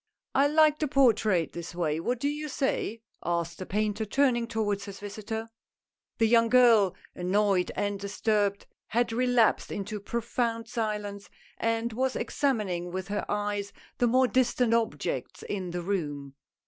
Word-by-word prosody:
" -, -, -65 dB
I 275 Hz, +1 st, +4 dB
like 305 Hz, 0 st, +4 dB
the 305 Hz, -, +1 dB
portrait 220 Hz, -, +3 dB
this 170 Hz, 0 st, -7 dB
way, 160 Hz, -3 st, 0 dB
what 245 Hz, +8 st, -1 dB
do 280 Hz, -, 0 dB
you 300 Hz, +1 st, -3 dB
say? 245 Hz, -5 st, -2 dB
" -, -, -45 dB
asked 170 Hz, -1 st, -2 dB
the 185 Hz, -, -6 dB
painter, 210 Hz, +1 st, -1 dB
turning 240 Hz, +1 st, +2 dB
towards 205 Hz, -3 st, -1 dB
his 200 Hz, -1 st, -8 dB
visitor. 220 Hz, +2 st, -5 dB, 0.7 s
The 225 Hz, -, +3 dB
young 230 Hz, 0 st, +4 dB
girl, 230 Hz, -7 st, +5 dB, 0.2 s
annoyed 190 Hz, 0 st, +1 dB
and 205 Hz, -1 st, -1 dB
disturbed, 200 Hz, 0 st, 0 dB, 0.2 s
had 235 Hz, 0 st, 0 dB
relapsed 245 Hz, -1 st, +2 dB
into 205 Hz, +1 st, -4 dB
profound 230 Hz, +1 st, -2 dB
silence, 210 Hz, -4 st, -3 dB, 0.3 s
and 230 Hz, 0 st, 0 dB
was 260 Hz, +3 st, 0 dB
examining 200 Hz, -11 st, -1 dB
with 185 Hz, +1 st, -5 dB
her 205 Hz, -, -2 dB
eyes 205 Hz, -1 st, -2 dB, 0.3 s
the 245 Hz, -, +4 dB
more 255 Hz, +2 st, +4 dB
distant 250 Hz, -2 st, +2 dB
objects 150 Hz, -, -1 dB
in 190 Hz, -3 st, -4 dB
the 175 Hz, 0 st, -4 dB
room. 145 Hz, -8 st, -3 dB
215 Hz, 155 wpm, -28 LUFS, 195-240 Hz, 0.7 s, girl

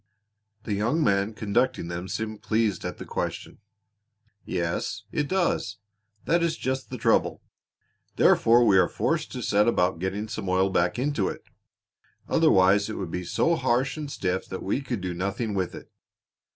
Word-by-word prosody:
The 105 Hz, -, -3 dB
young 120 Hz, +11 st, +1 dB
man 100 Hz, 0 st, +1 dB
conducting 115 Hz, -1 st, 0 dB
them 85 Hz, +2 st, -5 dB
seemed 110 Hz, +1 st, -4 dB
pleased 110 Hz, -4 st, 0 dB
at -, -, -5 dB
the -, -, -8 dB
question. -, -, -4 dB, 0.8 s
"Yes, 85 Hz, -1 st, -3 dB
it 150 Hz, -1 st, -1 dB
does! 175 Hz, -, 0 dB, 0.5 s
That 170 Hz, +1 st, +2 dB
is 170 Hz, -1 st, 0 dB
just 130 Hz, 0 st, -3 dB
the -, -, -5 dB
trouble. -, -, +1 dB, 0.7 s
Therefore 120 Hz, +1 st, +5 dB
we 95 Hz, -4 st, +5 dB
are 90 Hz, -, +3 dB
forced -, -, -1 dB
to -, -, -5 dB
set 105 Hz, +2 st, +3 dB
about 90 Hz, -6 st, +2 dB
getting 95 Hz, +4 st, -3 dB
some 100 Hz, -3 st, -5 dB
oil 95 Hz, +1 st, +2 dB
back 90 Hz, +2 st, +1 dB
into 130 Hz, -6 st, 0 dB
it; -, -, -8 dB, 0.8 s
otherwise 95 Hz, +3 st, +4 dB
it 110 Hz, -, -4 dB
would 90 Hz, -4 st, -5 dB
be 90 Hz, -, -3 dB
so 165 Hz, -, +1 dB
harsh 130 Hz, -2 st, +1 dB
and 150 Hz, -2 st, -5 dB
stiff 95 Hz, -4 st, -2 dB
that 95 Hz, -, -6 dB
we 105 Hz, +8 st, -1 dB
could 125 Hz, -7 st, -4 dB
do 90 Hz, -1 st, -3 dB
nothing 100 Hz, +5 st, -2 dB
with 95 Hz, -3 st, -2 dB
it. -, -, -12 dB
105 Hz, 165 wpm, -26 LUFS, 95-125 Hz, 0.8 s, Therefore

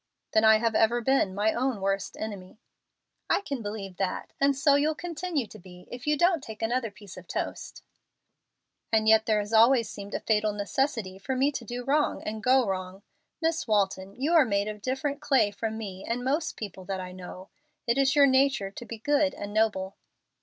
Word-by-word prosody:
"Then 220 Hz, -, +4 dB
I 220 Hz, 0 st, +7 dB
have 225 Hz, 0 st, 0 dB
ever 225 Hz, +2 st, +3 dB
been 240 Hz, -6 st, +1 dB
my 210 Hz, +2 st, +2 dB
own 255 Hz, -3 st, -1 dB
worst 195 Hz, 0 st, -2 dB
enemy." 200 Hz, -3 st, -7 dB, 0.7 s
"I -, -, +3 dB
can 280 Hz, -9 st, -4 dB
believe 205 Hz, -3 st, -6 dB
that, 190 Hz, -2 st, -3 dB
and 280 Hz, 0 st, +4 dB
so 280 Hz, +1 st, +4 dB
you'll 300 Hz, +2 st, +2 dB
continue 340 Hz, -4 st, -3 dB
to 215 Hz, -, -13 dB
be 180 Hz, 0 st, -14 dB
if 245 Hz, +3 st, -8 dB
you 300 Hz, 0 st, +2 dB
don't 345 Hz, 0 st, +3 dB
take 220 Hz, 0 st, -8 dB
another 235 Hz, +1 st, 0 dB
piece 200 Hz, -2 st, -13 dB
of 185 Hz, -1 st, -11 dB
toast." -, -, -5 dB, 1.1 s
"And 220 Hz, -1 st, +2 dB
yet 220 Hz, +1 st, +5 dB
there 215 Hz, -1 st, +3 dB
has 210 Hz, +1 st, -3 dB
always 230 Hz, 0 st, +5 dB
seemed 200 Hz, 0 st, -7 dB
a -, -, -1 dB
fatal 215 Hz, -1 st, +1 dB
necessity 210 Hz, -2 st, -2 dB
for 260 Hz, +7 st, -3 dB
me 270 Hz, +3 st, +2 dB
to 270 Hz, -4 st, -5 dB
do 245 Hz, +2 st, -5 dB
wrong 290 Hz, +3 st, +1 dB
and 215 Hz, 0 st, -4 dB
go 255 Hz, +1 st, +4 dB
wrong. 190 Hz, 0 st, -4 dB, 0.4 s
Miss 325 Hz, -3 st, 0 dB
Walton, 195 Hz, -2 st, 0 dB
you 285 Hz, +7 st, 0 dB
are 325 Hz, -3 st, +7 dB
made 200 Hz, -4 st, 0 dB
of 210 Hz, -1 st, -6 dB
different 280 Hz, +4 st, -2 dB
clay 260 Hz, -8 st, +3 dB
from 220 Hz, +2 st, -4 dB
me 195 Hz, -4 st, -7 dB
and 240 Hz, +1 st, -3 dB
most 290 Hz, +5 st, -1 dB
people 195 Hz, -3 st, -7 dB
that 195 Hz, 0 st, -3 dB
I 185 Hz, 0 st, -6 dB
know. 185 Hz, +1 st, -10 dB, 0.4 s
It 235 Hz, +2 st, +1 dB
is 275 Hz, +1 st, +3 dB
your 285 Hz, -1 st, +7 dB
nature 265 Hz, -7 st, +2 dB
to 240 Hz, -, -9 dB
be 230 Hz, -, -6 dB
good 290 Hz, +4 st, +1 dB
and 205 Hz, 0 st, -7 dB
noble." 205 Hz, -3 st, 0 dB
220 Hz, 205 wpm, -27 LUFS, 200-270 Hz, 1.1 s, I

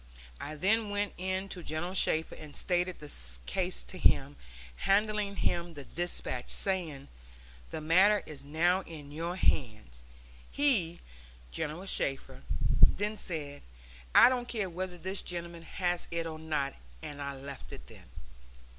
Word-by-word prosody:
I 155 Hz, -, -5 dB
then 210 Hz, +7 st, +2 dB
went 205 Hz, -1 st, -1 dB
in 190 Hz, +1 st, -2 dB
to 180 Hz, -, -5 dB
General 165 Hz, +3 st, -3 dB
Shafter 160 Hz, -4 st, +1 dB
and 150 Hz, -2 st, -10 dB
stated 180 Hz, 0 st, +1 dB
the 150 Hz, -1 st, -8 dB, 0.3 s
case -, -, -1 dB
to -, -, -6 dB
him, 70 Hz, -, +3 dB, 0.4 s
handing 210 Hz, 0 st, +2 dB
him 170 Hz, -3 st, -1 dB
the 145 Hz, -, -7 dB
despatch, 155 Hz, -6 st, -3 dB
saying, 170 Hz, -8 st, +4 dB, 0.6 s
'The -, -, -4 dB
matter 190 Hz, +7 st, +5 dB
is 150 Hz, -3 st, -8 dB
now 170 Hz, +6 st, +2 dB
in 150 Hz, -5 st, -10 dB
your 165 Hz, +4 st, -3 dB
hands.' 110 Hz, -, 0 dB, 0.5 s
He, 220 Hz, -, +1 dB, 0.5 s
General 155 Hz, -, -3 dB
Shafter, 135 Hz, -, 0 dB, 0.4 s
then 210 Hz, +2 st, +4 dB
said, 150 Hz, -8 st, -4 dB, 0.5 s
'I -, -, +10 dB
don't 250 Hz, -1 st, -1 dB
care 210 Hz, -7 st, -2 dB
whether 180 Hz, +1 st, -4 dB
this 190 Hz, +3 st, -1 dB
gentleman 170 Hz, -1 st, -5 dB
has 175 Hz, +1 st, -1 dB
it 170 Hz, 0 st, -2 dB
or 160 Hz, -1 st, -5 dB
not,' 150 Hz, -3 st, -1 dB, 0.3 s
and 145 Hz, -1 st, -6 dB
I 140 Hz, 0 st, -3 dB
left 135 Hz, +1 st, -9 dB, 0.2 s
then. -, -, -15 dB
170 Hz, 140 wpm, -31 LUFS, 145-190 Hz, 0.6 s, I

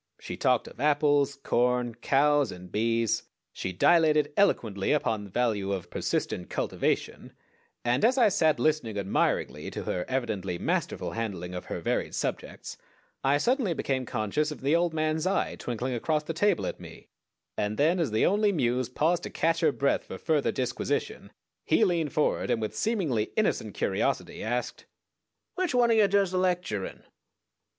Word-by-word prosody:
She -, -, -6 dB
talked -, -, +1 dB
of -, -, -13 dB
apples, 145 Hz, -1 st, +2 dB
corn, 125 Hz, -2 st, 0 dB
cows, 140 Hz, +4 st, +2 dB
and 90 Hz, 0 st, -11 dB
bees. 115 Hz, +1 st, +1 dB, 0.3 s
She 95 Hz, -, -4 dB
dilated 150 Hz, -, +3 dB
eloquently 110 Hz, -, +2 dB
upon 110 Hz, -8 st, 0 dB
the -, -, -11 dB
value 105 Hz, -3 st, 0 dB
of 90 Hz, -3 st, -4 dB
persistent 90 Hz, -, -2 dB
"cultivation," -, -, -2 dB, 0.5 s
and 120 Hz, +9 st, +1 dB
as 250 Hz, +4 st, +4 dB
I 240 Hz, -4 st, +5 dB
sat 160 Hz, -5 st, +2 dB
listening 150 Hz, -9 st, 0 dB
admiringly 100 Hz, -1 st, -1 dB
to -, -, -6 dB
her 90 Hz, -, -2 dB
evidently 110 Hz, -9 st, -2 dB
masterful -, -, -2 dB
handling 95 Hz, -6 st, -4 dB
of 90 Hz, -, -6 dB
her -, -, -5 dB
varied -, -, -1 dB
subjects -, -, -4 dB, 0.5 s
I 140 Hz, +2 st, +3 dB
suddenly 235 Hz, -, +1 dB
became 130 Hz, -4 st, -2 dB
conscious 125 Hz, +7 st, -1 dB
of 150 Hz, -, -8 dB
the 140 Hz, +4 st, +2 dB
old 170 Hz, 0 st, +2 dB
man's 155 Hz, +1 st, 0 dB
eye 195 Hz, -, 0 dB
twinkling 125 Hz, +2 st, -3 dB
across 150 Hz, +6 st, 0 dB
the 165 Hz, -, -4 dB
table 195 Hz, +2 st, +1 dB
at -, -, -4 dB
me, -, -, -12 dB, 0.5 s
and 105 Hz, +1 st, -2 dB
then, 165 Hz, +6 st, +3 dB
as 165 Hz, -, +1 dB
the 110 Hz, 0 st, +2 dB
Only 205 Hz, +1 st, +3 dB
Muse 125 Hz, -, 0 dB
paused 165 Hz, +7 st, +1 dB
to -, -, -6 dB
catch 165 Hz, 0 st, +1 dB
her 160 Hz, -3 st, +3 dB
breath 140 Hz, 0 st, 0 dB
for -, -, -7 dB
further 155 Hz, -4 st, +1 dB
disquisition, 135 Hz, -, -3 dB, 0.3 s
he 220 Hz, -, +3 dB
leaned 170 Hz, -5 st, 0 dB
forward, 150 Hz, -, 0 dB
and -, -, +1 dB
with 110 Hz, -1 st, -4 dB
seemingly 165 Hz, -, 0 dB
innocent -, -, 0 dB
curiosity -, -, -1 dB
asked: 125 Hz, -, -3 dB, 0.7 s
"_Which 365 Hz, -8 st, 0 dB
one 240 Hz, -1 st, +4 dB
o' -, -, +5 dB
ye 215 Hz, -2 st, +5 dB
does 195 Hz, -2 st, +2 dB
the 185 Hz, -, 0 dB
lecturin'? 180 Hz, -, -2 dB
145 Hz, 165 wpm, -28 LUFS, 115-170 Hz, 0.7 s, I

